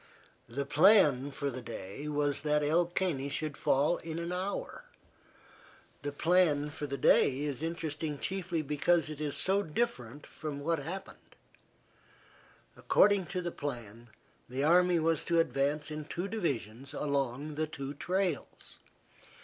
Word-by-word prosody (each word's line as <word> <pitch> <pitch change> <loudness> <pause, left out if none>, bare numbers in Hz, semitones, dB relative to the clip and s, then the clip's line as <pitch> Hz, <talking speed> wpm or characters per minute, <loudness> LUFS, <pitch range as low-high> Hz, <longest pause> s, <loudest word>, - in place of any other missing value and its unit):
The 140 +4 -3
plan 150 -4 +5
for 140 0 -3
the 130 0 -6
day 115 +3 -7
was 145 -1 0
that 150 0 +1
El 165 +4 +3
Caney 170 -6 -1
should 150 0 -3
fall 145 +6 +2
in 160 0 -6
an 170 +1 -3
hour. 195 - -4 1.2
The 145 - -3
plan 150 -2 +2
for 145 0 -5
the 140 0 -4
day 135 +1 +4
is 145 -2 -3
interesting 160 -2 -3
chiefly 180 -1 -2
because 155 +3 +1
it 155 0 -7
is 150 -2 -2
so 195 +2 +3
different 150 - -3
from 150 -2 -6
what 165 +2 0
happened. 185 +7 -8 1.4
According 200 -4 +3
to 180 0 -3
the 175 - -2
plan 120 -6 -6 0.4
the 130 +2 -2
army 175 +3 +5
was 165 -1 +1
to 170 - +1
advance 150 -1 +1
in 150 0 -5
two 175 +5 -4
divisions 140 - -3
along 140 0 -1
the 155 +1 -1
two 140 -3 -6
trails. 180 +1 -3
150 Hz, 140 wpm, -31 LUFS, 140-170 Hz, 1.4 s, plan